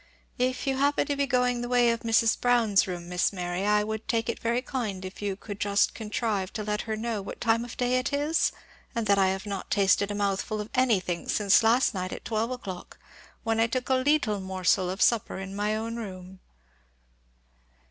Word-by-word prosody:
"If 255 +2 0
you 270 -1 0
happen 285 +2 +2
to 285 - -1
be 280 0 0
going 250 -2 +1
the 240 - -4
way 245 -1 +4
of 230 - -1
Mrs. 225 0 +2
Brown's 230 -5 +3
room, 175 -2 -5
Miss 180 0 +1
Mary, 180 0 -3
I 210 0 +3
would 220 +1 -5
take 230 -1 0
it 235 - -2
very 235 +2 0
kind 215 -8 -4
if 185 +2 -9
you 200 -2 -2
could 205 +1 -8
just 200 -1 +2
contrive 215 -3 -2
to 215 - -3
let 210 0 -1
her 220 - 0
know 225 -2 -2
what 195 - -8
time 230 0 +2
of 240 - -9
day 250 0 +2
it 255 - -2
is; 290 +3 +1 0.4
and 230 -1 -1
that 200 -1 +3
I 190 - +4
have 190 +1 -2
not 200 -2 -5
tasted 200 0 +3
a 205 - -3
mouthful 205 +1 -1
of 210 +1 -6
anything 200 -9 +1
since 200 0 +4
last 230 +3 +3
night 185 -1 -3
at - - -7
twelve 225 +1 -1
o'clock, 195 -8 -7 0.5
when 225 -1 0
I 225 - +4
took 250 +2 -3
a - - +4
leettle 255 -5 +2
morsel 185 -1 +1
of 190 +3 0
supper 230 -3 +2
in 195 0 -6
my 210 +1 0
own 230 +1 -4
room." 190 -4 -8
220 Hz, 210 wpm, -27 LUFS, 195-245 Hz, 0.5 s, way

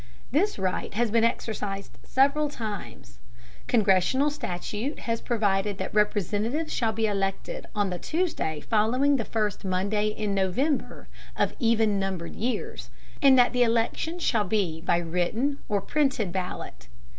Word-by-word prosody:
This 365 - +2
right 190 -2 -2
has 235 0 +1
been 230 0 +3
exercised 205 -4 -2
several 280 +3 +2
times. 205 - -7 0.5
Congressional 220 +7 +3
statute 215 - -4
has 230 -1 -2
provided 205 -4 0
that - - -4
Representatives 210 - 0
shall 225 -2 +1
be 220 0 0
elected 205 - -2
on 205 -2 +1
the 180 - -3
Tuesday 310 - -1
following 250 +6 +2
the 230 - -2
first 215 -3 -1
Monday 200 +3 0
in 210 -1 -2
November 220 - 0 0.3
of - - +1
even 225 -4 +3
numbered 190 -3 -3
years, 245 +3 -3 0.3
and 270 -2 +7
that 245 -1 +5
the 250 - +1
election 235 +8 +1
shall 230 -11 +1
be 180 -5 -1
by 170 0 +2
written 180 - -1
or 205 -2 +1
printed 265 - 0
ballot. 180 - -5
215 Hz, 140 wpm, -27 LUFS, 195-255 Hz, 0.5 s, and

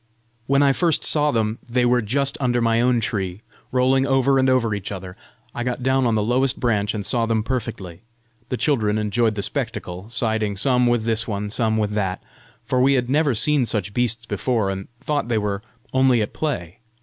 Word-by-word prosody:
When 140 +1 +3
first 170 +1 +1
I - - -3
saw 150 -1 +3
them, 110 -3 -1
they 125 +1 +2
were 120 0 +3
just 140 +6 0
under 120 -2 +1
my 115 0 +2
own 120 -1 +2
tree, 95 -3 -3 0.3
rolling 130 +1 +2
over 135 0 +3
and 130 0 +3
over 120 -4 +2
each 100 -1 -5
other. 95 -2 -7 0.4
I 120 - -3
got 125 0 -3
down 130 -1 +2
on 115 - +1
the 105 - +1
lowest 125 +4 +1
branch, 105 -3 0
and 105 -2 -4
saw 115 -2 0
them 110 -1 0
perfectly. 110 -8 -4 0.5
The 125 - -2
children 110 -8 +1
enjoyed 110 +1 +1
the 100 - -3
spectacle, 110 -7 -4
siding 110 -3 0
some 125 +2 +2
with 120 -2 +1
this 115 0 0
one, 105 -1 -3
some 110 -1 0
with 105 -1 0
that, 95 -3 -1 0.5
for 125 - +1
we 135 +2 +4
had 125 -1 0
never 145 -3 +2
seen 130 +3 +3
such 100 -3 -2
beasts 120 -1 -1
before, 115 -5 -1
and 95 0 -6
thought 145 -4 -2
they 120 -2 0
were 105 -1 -2 0.3
only 130 -3 +3
at 105 - -6
play. 115 - -4
115 Hz, 200 wpm, -22 LUFS, 105-130 Hz, 0.5 s, we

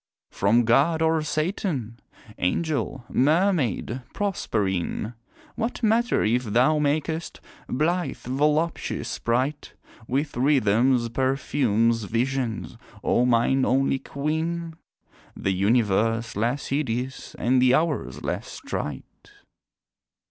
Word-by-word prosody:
From 110 +5 +3
God 150 +8 +3
or 160 0 +2
Satan? 155 - -2 0.4
Angel, 135 - -1
Mermaid, 145 - +1
Proserpine? 105 - -1 0.4
What 235 +2 -3
matter 230 +3 +2
if 120 +4 +2
thou 125 +8 +3
makest 155 +3 -1 0.3
blithe, 170 +6 0
voluptuous 150 +5 -1
sprite 130 +5 -2 0.3
With 140 +3 -1
rhythms, 125 -2 +3
perfumes, 115 -3 +1
visions 120 +1 -2 0.3
O 125 +1 +2
mine 125 +3 +3
only 135 +1 +2
queen! 160 +5 -3 0.6
The 95 - 0
universe 115 +3 +1
less 120 +7 -1
hideous 130 -2 -3
and 125 +2 +2
the 130 0 +5
hours 155 -1 -1
less - - -4
trite. 70 -3 -4
130 Hz, 95 wpm, -25 LUFS, 115-155 Hz, 0.6 s, the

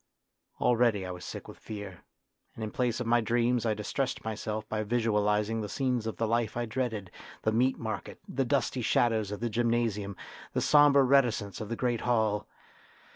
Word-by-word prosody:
Already 115 -5 +3
I 90 - -4
was 90 -1 -8
sick - - -7
with - - -11
fear, 100 -4 -8 0.5
and 110 - -6
in 110 - -3
place 125 -2 0
of 125 - -2
my 120 +1 +3
dreams 120 +1 +1
I 110 - +1
distressed 125 +5 -2
myself 110 0 -3
by 110 -1 -2
visualising 105 -1 +1
the 105 - -4
scenes 125 -3 -1
of 110 - -4
the 115 - 0
life 115 0 0
I 120 - 0
dreaded 110 -5 -3 0.3
the 110 - +2
Meat 125 +4 +2
Market, 110 -2 -5
the 135 - 0
dusty 125 -1 0
shadows 110 -3 +2
of 105 +1 -5
the 120 - 0
gym 120 +2 +1
nasium, 105 -4 0 0.4
the - - +1
sombre 145 -2 +6
reticence 120 -8 +2
of 105 - -5
the 115 - -2
great 120 -1 0
hall. 110 -4 +1
115 Hz, 185 wpm, -29 LUFS, 105-120 Hz, 0.5 s, sombre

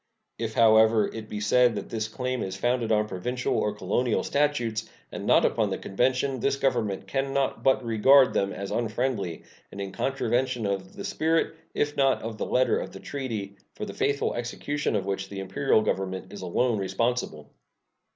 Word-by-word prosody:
If, 115 -1 -3
however, 110 -1 +5
it 110 -1 -8
be 105 - -4
said 120 +3 +3
that 100 - -5
this 110 -1 -2
claim 125 +2 -3
is 95 0 -3
founded 120 +2 0
on 105 0 +2
provincial 125 +6 -2
or 105 0 0
colonial 120 +2 0
statutes, 120 -7 0 0.2
and - - -6
not - - +5
upon - - +1
the - - -2
convention, 130 +5 0
this 140 - +1
Government 120 -8 0
can 135 0 -2
not 135 -1 0
but 130 -2 +2
regard 130 +4 +5
them 100 0 +1
as 100 0 -5
unfriendly, 115 -6 -2 0.3
and 100 - -9
in 100 -1 -4
contravention 125 0 -1
of 95 -1 -3
the - - -6
spirit, 160 +1 0 0.2
if 145 0 0
not 135 -1 +2
of 110 -1 -6
the - - -2
letter, 130 +1 +2
of - - -6
the - - -9
treaty, 110 -8 -5 0.2
for - - -4
the - - -7
faithful 140 0 0
execution 120 +3 -2
of 100 -2 -1
which 95 -1 -3
the 100 - -6
Imperial 95 +4 +1
Government 95 -1 -3
is 100 - -8
alone 110 +5 +1
responsible. 115 -5 -2
115 Hz, 180 wpm, -27 LUFS, 100-130 Hz, 0.3 s, however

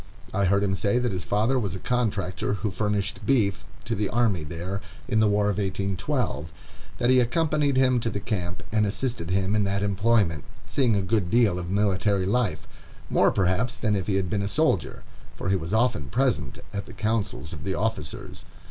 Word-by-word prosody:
I 100 - +2
heard 100 +2 +3
him 95 -1 +1
say 100 +4 +1
that 125 -2 +1
his 90 -2 -3
father 110 +8 +1
was 100 -5 -2
a - - -6
contractor 100 -5 -1
who 105 0 -2
furnished 105 0 -2
beef 105 -8 +2 0.2
to 115 - -2
the 105 -2 -1
army 110 -9 +1
there, 85 +6 -5 0.3
in 115 -4 +1
the 110 - +5
war 105 0 +2
of 105 0 0
1812; 95 - -2 0.5
that 120 +1 +2
he 130 - +6
accompanied 145 +2 +1
him 130 -1 +4
to 115 - -1
the 105 - -3
camp, 90 -4 -3
and 105 -1 +2
assisted 100 -5 -2
him 95 +2 +1
in 105 - +3
that 100 +1 0
employment, 100 -5 +2 0.2
seeing 125 -6 +2
a 100 - +1
good 95 -2 0
deal 110 -6 +3
of 85 -1 -5
military 100 0 +1
life, 110 +1 0 0.4
more, - - +5
perhaps, 100 +7 0
than 105 -2 +1
if 95 -2 -2
he 100 - +1
had 95 -1 0
been 100 +4 -1
a 100 - -1
soldier, 125 - 0 0.3
for - - -3
he 95 - +3
was 85 -1 -4
often 110 - +2
present 120 - 0 0.2
at 100 -1 -4
the - - -10
councils 110 -7 -2
of - - -7
the 95 -1 -2
officers. 105 -9 -4
100 Hz, 200 wpm, -26 LUFS, 95-115 Hz, 0.5 s, he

